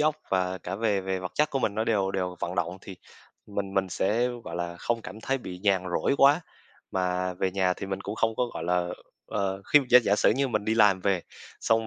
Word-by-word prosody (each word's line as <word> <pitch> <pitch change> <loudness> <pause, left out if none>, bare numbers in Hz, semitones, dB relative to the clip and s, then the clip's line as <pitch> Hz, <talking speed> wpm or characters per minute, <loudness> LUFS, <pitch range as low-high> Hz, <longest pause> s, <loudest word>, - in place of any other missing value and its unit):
óc 155 0 +2
và 95 -1 0
cả 95 - -5
về 105 -2 +1
về 95 0 -2
vật 90 0 -6
chất 150 0 +2
của 135 - 0
mình 105 -5 0
nó 110 - 0
đều 100 -4 +1
đều 90 -2 -2
vận 90 - -3
động 90 +1 -2
thì 95 - -10 0.5
mình 100 -1 -4
mình 95 -1 +1
sẽ, 110 +7 +1 0.2
gọi 85 - -6
là, 85 0 -4
không 115 +5 -2
cảm 95 +4 -9
thấy 135 +4 -1
bị 90 -7 -8
nhàn 95 -1 +2 0.2
rỗi - - +1
quá, 140 +4 +6 0.5
mà 90 0 -1
về 95 +1 -1
nhà 95 -1 +1
thì - - -6
mình 95 0 -4
cũng 100 +1 -5
không 115 0 0
có, 125 - +2
gọi 80 - -4
là, 90 0 +1 0.4
ờ, 95 -1 -2
khi 150 - +10
giả 125 - +10
giả 100 -2 +2
sử - - +4
như 135 +4 +1
mình 105 -4 -1
đi 110 +1 +1
làm 105 -4 +5
về, 95 -2 +1 0.4
xong 115 0 +2
95 Hz, 245 wpm, -27 LUFS, 90-110 Hz, 0.5 s, khi